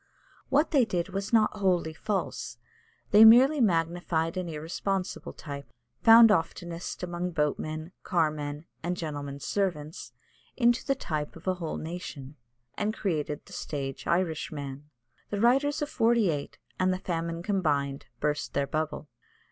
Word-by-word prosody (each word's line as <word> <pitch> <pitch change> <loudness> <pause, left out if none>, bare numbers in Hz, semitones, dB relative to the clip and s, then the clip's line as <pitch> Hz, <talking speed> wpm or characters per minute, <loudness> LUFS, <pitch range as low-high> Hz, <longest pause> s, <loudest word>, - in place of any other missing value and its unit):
What 295 +4 +3
they 275 -5 +5
did 180 -5 -1
was 195 +1 -4
not 215 -2 +3
wholly 180 -5 +1
false; 195 +4 -3 0.5
they 210 +1 +9
merely 255 +6 +8
magnified 165 -3 +1
an 180 -2 -3
irresponsible 180 +5 -3
type, 140 -2 -8 0.3
found 225 0 +9
oftenest 170 -1 -2
among 175 0 -3
boatmen, 155 +2 -2
carmen, 150 -3 -1 0.2
and 175 +2 -2
gentlemen's 145 -3 -5
servants, 170 -6 -2 0.5
into 240 0 +3
the 275 - +1
type 155 - -4
of 165 +3 -13
a 185 - +3
whole 170 -3 -4
nation, 155 -4 -7 0.4
and 215 +1 -1
created 150 -6 -2
the - - -14
stage 135 -3 -5
Irishman. 150 -5 -2 0.4
The 205 - -2
writers 275 +6 +3
of 295 - -4
'Forty 230 - +3
eight, 145 -1 -5 0.2
and 185 0 +3
the 185 - 0
famine 170 -2 -3
combined, 145 -9 0
burst 150 0 -2
their 140 0 +2
bubble. 155 +1 -3
170 Hz, 140 wpm, -28 LUFS, 150-205 Hz, 0.5 s, they